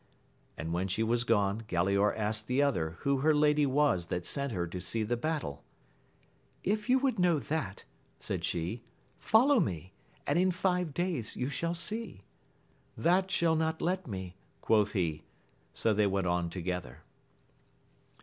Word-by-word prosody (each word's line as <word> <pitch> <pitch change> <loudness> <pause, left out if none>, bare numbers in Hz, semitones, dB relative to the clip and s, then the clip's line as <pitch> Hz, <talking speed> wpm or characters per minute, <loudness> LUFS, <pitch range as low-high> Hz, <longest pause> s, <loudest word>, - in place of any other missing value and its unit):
And 80 +2 -4
when 90 +2 0
she 95 +4 0
was 120 +1 +1
gone, 105 -2 +1
Galaor 100 +4 +2
asked 110 0 -1
the 125 +2 +1
other 85 - +1
who 140 0 +2
her 155 +2 +3
lady 150 -1 +4
was 135 -11 +2
that 90 -1 -3
sent 140 -1 -2
her 90 -5 -1
to 90 +1 -6
see 110 +4 -1
the 120 +3 0
battle) 120 - -3 1.0
If 210 +4 -1
you 255 - +6
would 265 -5 0
know 175 -3 +4
that, 150 -10 -3 0.3
said - - -4
she, 90 +7 -2 0.4
follow 255 +4 +5
me, 90 - -2 0.3
and - - +2
in 185 +1 +4
five 180 -2 0
days 175 - -2
you 125 +2 -2
shall 165 +5 -2
see. 210 - -3 0.7
That 185 +3 +2
shall 170 -4 +2
not 160 0 0
let 180 +1 -1
me, 95 -4 -6 0.2
quoth 105 -2 +2
he. 85 -7 -1 0.5
So 110 - +2
they 105 0 +3
went 95 -1 0
on 85 -1 0
together. 85 -6 -5
115 Hz, 160 wpm, -31 LUFS, -, 1.0 s, you